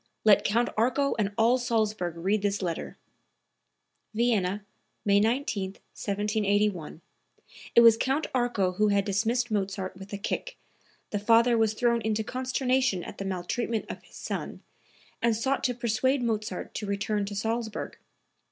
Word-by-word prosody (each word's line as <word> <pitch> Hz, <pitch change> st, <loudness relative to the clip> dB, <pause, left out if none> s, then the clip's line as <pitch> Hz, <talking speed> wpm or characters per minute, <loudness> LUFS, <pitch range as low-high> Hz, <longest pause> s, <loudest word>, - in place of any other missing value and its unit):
Let 210 Hz, -2 st, +6 dB
Count 235 Hz, +3 st, +2 dB
Arco 255 Hz, +5 st, +2 dB
and 205 Hz, -1 st, +1 dB
all 235 Hz, +3 st, +4 dB
Salzburg 215 Hz, -8 st, -1 dB
read 195 Hz, +5 st, 0 dB
this 200 Hz, -1 st, -1 dB
letter." 170 Hz, -2 st, -4 dB, 1.2 s
(Vienna, 210 Hz, -4 st, +1 dB, 0.4 s
May 200 Hz, -1 st, +5 dB
19, 215 Hz, -4 st, 0 dB
1781. 205 Hz, -5 st, -1 dB, 0.7 s
It 235 Hz, -, +9 dB
was 230 Hz, -1 st, +8 dB
Count 270 Hz, +6 st, 0 dB
Arco 240 Hz, -7 st, +1 dB
who 210 Hz, +4 st, +2 dB
had 200 Hz, -1 st, +2 dB
dismissed 225 Hz, +4 st, 0 dB
Mozart 195 Hz, -2 st, -2 dB
with 195 Hz, +1 st, -11 dB
a 200 Hz, -, -3 dB
kick. -, -, -4 dB, 0.5 s
The 205 Hz, -, -1 dB
father 230 Hz, +3 st, +4 dB
was 220 Hz, -1 st, +2 dB
thrown 235 Hz, 0 st, +2 dB
into 220 Hz, 0 st, 0 dB
consternation 255 Hz, -4 st, 0 dB
at -, -, -9 dB
the 195 Hz, -, -4 dB
maltreatment 195 Hz, +5 st, -2 dB
of -, -, -8 dB
his -, -, -19 dB
son -, -, -5 dB, 0.6 s
and 235 Hz, -1 st, +3 dB
sought 265 Hz, +5 st, 0 dB
to 250 Hz, -1 st, +1 dB
persuade 245 Hz, +3 st, +1 dB
Mozart 220 Hz, -1 st, -3 dB
to 210 Hz, -, -4 dB
return 200 Hz, +1 st, -1 dB
to 205 Hz, +1 st, -6 dB
Salzburg. 225 Hz, +1 st, -3 dB
215 Hz, 145 wpm, -28 LUFS, 200-240 Hz, 1.2 s, It